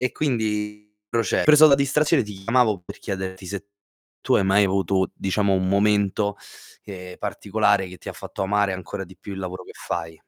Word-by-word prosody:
e 125 0 -1
quindi 105 -6 -2
proce 115 -3 +1
preso 155 +1 +8
la 145 - +6
distrazione 140 +2 +2
ti 105 -1 -8
chiamavo 110 0 +1
per - - -10
chiederti 95 -1 -5
se 100 +2 -6 0.5
tu - - +1
hai - - +3
mai 100 +2 +4
avuto, 95 0 +1
diciamo 100 +1 0
un 95 0 0
momento, 100 0 +2 0.5
ehm, 90 -2 -9
particolare 100 -2 0
che 90 - -10
ti - - -10
ha - - -4
fatto - - -6
amare 100 0 +1
ancora 95 +2 -5
di 95 0 -16
più 95 +2 -9
il 95 - -6
lavoro 90 -1 -5
che - - -12
fai. 80 0 -5
100 Hz, 185 wpm, -23 LUFS, 95-105 Hz, 0.5 s, preso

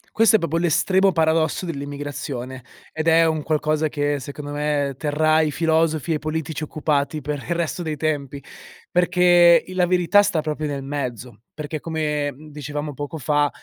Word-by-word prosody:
Questo 225 0 +5
è - - -6
proprio 165 -2 -1
l'estremo 185 +3 +3
paradosso 160 +1 +1
dell'immigrazione 140 -4 -6 0.3
ed 155 +1 -3
è 165 0 +5
un 160 -2 0
qualcosa 155 0 0
che 145 -1 -1
secondo 145 +2 -7
me 145 -2 -1
terrà 155 +2 +2
i 155 -1 0
filosofi 160 0 +1
e - - +2
i - - -3
politici 155 0 -4
occupati 150 0 -1
per 150 0 -3
il 170 - -1
resto 170 0 -2
dei 155 -2 -3
tempi, 140 -3 -2 0.5
perché 175 -1 +5
il 185 - -9
la 180 - +5
verità 180 +3 +4
sta 185 -6 0
proprio 155 0 -3
nel 140 -2 -4
mezzo. 125 -5 -5
Perché 150 0 -5
come, 150 -2 -2
mhmm, 150 +4 -14
dicevamo 150 0 -5
poco 145 +3 -6
fa, 145 +1 +1
155 Hz, 170 wpm, -22 LUFS, 145-165 Hz, 0.5 s, Questo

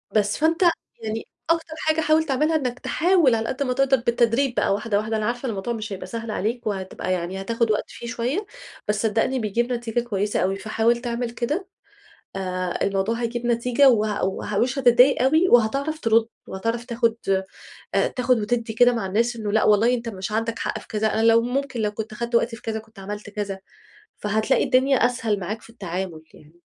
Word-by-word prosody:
بس، 205 -1 +2
فأنت 325 +3 +1 0.4
يعني 220 0 -4 0.2
أكتر 330 -1 0
حاجة 315 0 +1
حاول 315 0 +3
تعملها 305 +2 +1
إنك 255 -4 -1
تحاول 335 -7 +3
على 225 0 -2
قد 275 +2 -1
ما 255 -2 0
تقدر 270 +1 +3
بالتدريج 235 +2 +1
بقى - - +2
واحدة، 205 +1 0
واحدة، 220 +1 -1
أنا 215 - -1
عارفة 245 +3 -2
الموضوع 215 +2 -3
مش 215 -2 -5
هيبقى 185 -1 -7
سهل 230 +2 -5
عليك 230 +3 -2
وهتبقى 190 -2 -3
يعني 185 +2 -3
هتاخد 230 +2 0
وقت 210 - +1
فيه 235 - -9
شوية، 250 - -2 0.4
بس 210 0 0
صدقني 230 +4 +1
بيجيب 235 +3 -1
نتيجة 240 -1 -2
كويسة 210 -3 -1
أوي، 190 +1 +1
فحاول 220 +4 +1
تعمل 240 -1 -2
كده، 295 +11 -2 0.7
آآ 185 -2 -3
الموضوع 195 +3 0
هيجيب 240 +1 -3
نتيجة 240 +3 +4
وه 215 -3 +1
وه 195 +2 -3
ومش 250 +4 +1
هتضايق 250 +1 +5
أوي 315 +7 +4
وهتعرف 275 +7 +3
ترد 225 -3 +3 0.2
وهتعرف 230 +5 -3
تاخد 230 -2 +1 0.8
آآ - - +3
تاخد 250 -1 +1
وتدّي 230 +2 -1
كده 245 +2 +5
مع 230 -5 -2
الناس 230 +5 0
إنه 210 -2 -3
لأ 220 - +3
والله 220 +4 +4
أنت 235 -1 -4
مش 195 -1 -5
عندك 225 +1 -1
حق - - -2
في - - -14
كذا، 215 0 -1
أنا 220 - +1
لو 230 0 +6
ممكن 255 0 -2
لو 210 -1 +1
كنت 215 +1 -6
خدت 235 +2 -4
وقتي 230 0 +2
في - - -16
كذا، 220 -1 -3
كنت 220 -1 -15
عملت 205 +2 -7
كذا. 200 -2 -4 0.6
فهتلاقي 220 +5 +1
الدنيا 265 +1 +3
أسهل 225 -4 -1
معاك 210 +5 -4
في - - -15
التعامل 180 -6 -5
يعني. 160 +3 -19
230 Hz, 195 wpm, -23 LUFS, 210-250 Hz, 0.8 s, لو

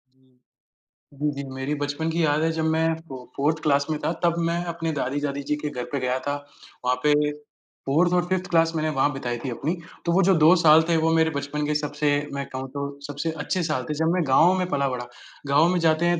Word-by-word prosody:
जी। 130 -1 -32 0.8
जी, 150 +1 0
जी, 140 - -4
मेरी 135 +2 -3
बचपन 145 +3 -2
की 165 +1 0
याद 150 0 +2
है 165 - +2
जब 160 0 -2
मैं 160 0 +1 0.2
फो 135 - -7 0.2
4th 150 +3 +1
क्लास 140 -2 +2
में 155 - 0
था, - - -1
तब 170 -1 +3
मैं 170 +1 -1
अपने 165 -1 -3
दादी 140 0 -2
जादि 140 -1 -3
जी 150 - +2
के 150 0 -4
घर 125 -4 -5
पे 140 - -1
गया 130 0 0
था। 145 - 0 0.5
वहाँ 125 - +3
पे 150 - +4 0.8
4th 170 +6 +3
और 180 -1 +2
5th 185 -1 -1
क्लास 165 -1 +3
मैंने 155 0 0
वहाँ 145 +2 +3
बिताई 120 -3 -3
थी - - -2
अपनी। 145 +8 -2 0.3
तो 170 - +1
वो 190 +3 +4
जो 190 0 +4
2 160 +4 +7
साल 155 0 +8
थे 165 - +3
वो 165 - +3
मेरे 160 0 +3
बचपन 145 +1 -3
के 150 - 0
सबसे 150 0 -1 0.2
मैं 140 0 -3
कहूँ 130 0 -5
तो 140 0 -5
सबसे 145 +3 -3
अच्छे 185 +2 -1
साल 155 -5 -1
थे, - - 0
जब 160 +2 +1
मैं 180 - +1
गाँव 165 +7 +5
में 180 - 0
पला-बड़ा, 130 -5 -1 0.4
गाँव 145 +4 +4
में 180 - +1
जाते 165 0 +2
हैं, 175 -1 +2
150 Hz, 235 wpm, -24 LUFS, 140-165 Hz, 0.8 s, साल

